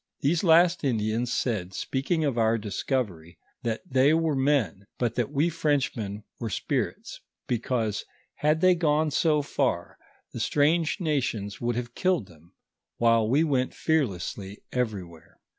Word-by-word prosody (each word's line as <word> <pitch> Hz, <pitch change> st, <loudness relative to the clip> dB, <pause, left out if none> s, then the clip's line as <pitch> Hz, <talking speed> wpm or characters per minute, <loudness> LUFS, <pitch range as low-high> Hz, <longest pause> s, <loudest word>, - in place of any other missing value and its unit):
These 155 Hz, +6 st, +1 dB
last 170 Hz, +1 st, +5 dB
Indians 115 Hz, -1 st, 0 dB
said, 95 Hz, -8 st, -1 dB
speaking 155 Hz, +4 st, -1 dB
of 140 Hz, -4 st, 0 dB
our 115 Hz, -1 st, +2 dB
discovery, 100 Hz, -, -3 dB, 0.2 s
that 115 Hz, -1 st, -2 dB
they 135 Hz, +4 st, +4 dB
wore 165 Hz, -2 st, +1 dB
men, 130 Hz, -, +1 dB
but 120 Hz, -2 st, 0 dB
that 120 Hz, -3 st, -1 dB
wo 150 Hz, +4 st, +1 dB
Frenchmen 130 Hz, -10 st, -1 dB, 0.2 s
were 115 Hz, -, -3 dB
spirits, -, -, -3 dB, 0.3 s
because, 115 Hz, -3 st, -1 dB, 0.3 s
had 155 Hz, +2 st, +2 dB
they 185 Hz, 0 st, +6 dB
gone 155 Hz, -2 st, +1 dB
so 150 Hz, 0 st, +2 dB
far, 130 Hz, -11 st, -1 dB, 0.3 s
the -, -, -5 dB
strange 160 Hz, +5 st, +2 dB
nations 130 Hz, -, -2 dB
would 120 Hz, 0 st, 0 dB
have 120 Hz, 0 st, -4 dB
killed 180 Hz, -, +1 dB
them, 85 Hz, -1 st, -20 dB, 0.4 s
while 115 Hz, -2 st, +3 dB
we 145 Hz, +6 st, +4 dB
went 135 Hz, -5 st, 0 dB
fearlessly 100 Hz, -, -2 dB
everywhere. 100 Hz, -10 st, -4 dB
125 Hz, 140 wpm, -27 LUFS, 110-150 Hz, 0.4 s, they